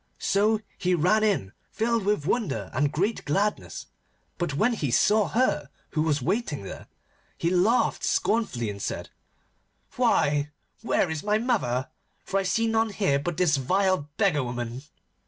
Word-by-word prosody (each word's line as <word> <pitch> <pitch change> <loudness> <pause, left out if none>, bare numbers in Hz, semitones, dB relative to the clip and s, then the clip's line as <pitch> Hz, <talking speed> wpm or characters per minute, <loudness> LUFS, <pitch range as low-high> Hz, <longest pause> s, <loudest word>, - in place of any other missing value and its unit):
So 210 +2 +2 0.2
he 180 -1 +2
ran 185 +7 +3
in, 155 - 0 0.2
filled 230 -2 0
with 205 -8 +1
wonder 150 - -1
and 140 +3 +1
great 200 +9 -1
gladness. 200 +8 -1 0.5
But 175 -6 -1
when 220 +11 +2
he 150 - -2
saw 210 - +3
her 225 - 0 0.2
who 155 - 0
was 150 -4 0
waiting 180 - -1
there, 95 - -9 0.5
he 170 - 0
laughed 195 +7 +2
scornfully 165 - 0
and 100 0 -9
said, - - -4 0.9
'Why, 145 0 +2 0.3
where 195 -6 +1
is 160 -2 -3
my 210 +1 +1
mother? 195 - 0 0.4
For 195 - 0
I - - -1
see 230 0 +1
none 225 0 +1
here 195 -9 +1
but 160 +3 -3
this 170 -5 +3
vile 185 +2 +1
beggar 180 -10 +2
woman. 120 0 -4
180 Hz, 155 wpm, -26 LUFS, 145-215 Hz, 0.9 s, ran